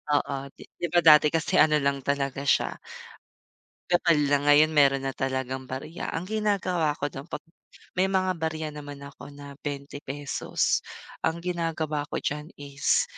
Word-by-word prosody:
oo 145 -1 0 0.2
di 175 - -6
ba 175 +1 +2
dati 150 -1 +8
kasi 165 +4 +1
ano 155 -1 +6
lang 140 0 +1
talaga 140 0 -2
siya - - +3 1.1
kapal 175 -2 +3
na 145 0 +2
ngayon 150 +2 +6
meron 140 -2 +4
na 135 - -1
talagang 130 0 -3
barya, 135 +6 -5
ang 160 - -3
ginagawa 185 -7 0
ko 145 0 -3
dun 135 +5 -8
pag - - -6 0.6
may 190 - +3
mga 185 -1 +1
barya 160 -1 -2
naman 145 -1 -9
ako 140 0 -11
na 145 0 -10
₱20, 145 0 -2 0.4
ang 160 - 0
ginagawa 160 -4 -2
ko - - -4
diyan 150 +1 -3
is 145 0 +1
145 Hz, 150 wpm, -27 LUFS, 140-165 Hz, 1.1 s, dati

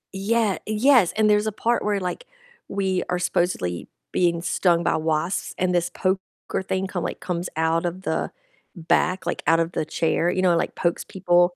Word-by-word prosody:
Yeah, 210 0 +1
yes, 220 -2 +4
and 215 -1 +4
there's 210 +1 +3
a 215 - 0
part 235 +3 0
where, 205 -1 0
like, 190 - -4 0.4
we 190 -2 0
are 180 - +1
supposedly 175 - -1 0.2
being 170 -2 +1
stung 175 -2 +2
by - - +2
wasps, 160 +3 -1
and 180 0 +1
this 175 -1 +1
poker 190 0 0 0.4
thing 190 0 -2
come, 185 -3 -3
like, - - -4
comes 175 -1 -3
out 160 +1 +1
of 180 +2 -4
the - - -1 0.4
back, 175 +1 +1
like, - - -2
out 165 0 +5
of 165 +1 0
the 155 - -2
chair, 165 +2 0
you 185 +1 0
know, 180 - +5
it, - - +3
like, - - -2
pokes 170 -1 0
people. 175 -1 +2
180 Hz, 190 wpm, -24 LUFS, 170-195 Hz, 0.4 s, out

